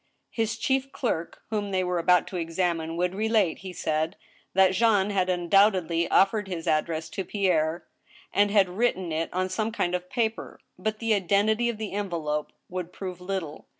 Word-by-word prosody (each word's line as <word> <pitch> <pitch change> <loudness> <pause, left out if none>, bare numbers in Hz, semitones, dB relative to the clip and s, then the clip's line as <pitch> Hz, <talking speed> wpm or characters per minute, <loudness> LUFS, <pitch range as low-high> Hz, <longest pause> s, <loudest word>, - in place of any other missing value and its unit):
His 225 0 -1
chief 270 +2 0
clerk, 170 -10 -3
whom 205 -2 -1
they 190 -1 0
were 180 -1 0
about 180 0 +4
to 190 - -8
examine, 165 -1 -1
would 180 +1 0
relate, 215 -3 +1
he 190 -1 -7
said, 160 -2 -1 0.4
that 190 -1 +6
Jean 210 -1 +3
had 185 -2 +1
undoubtedly 180 -1 +3
offered 205 +1 +3
his 175 -3 -5
address 160 +1 0
to 195 - -3
Pierre, 175 -5 0 0.5
and 205 0 +4
had 200 -2 +4
written 185 -2 0
it 160 +1 -2
on 185 +1 0
some 215 +4 -2
kind 180 -5 -1
of 180 0 -3
paper. 225 -3 -2 0.2
But 215 +3 -2
the 225 0 +1
identity 210 +4 +2
of 235 - -3
the 215 -1 -5
envelope 165 -7 -2 0.2
would 180 -1 -5
prove 185 -1 -7
little. 180 -5 -5
185 Hz, 175 wpm, -26 LUFS, 170-210 Hz, 0.5 s, that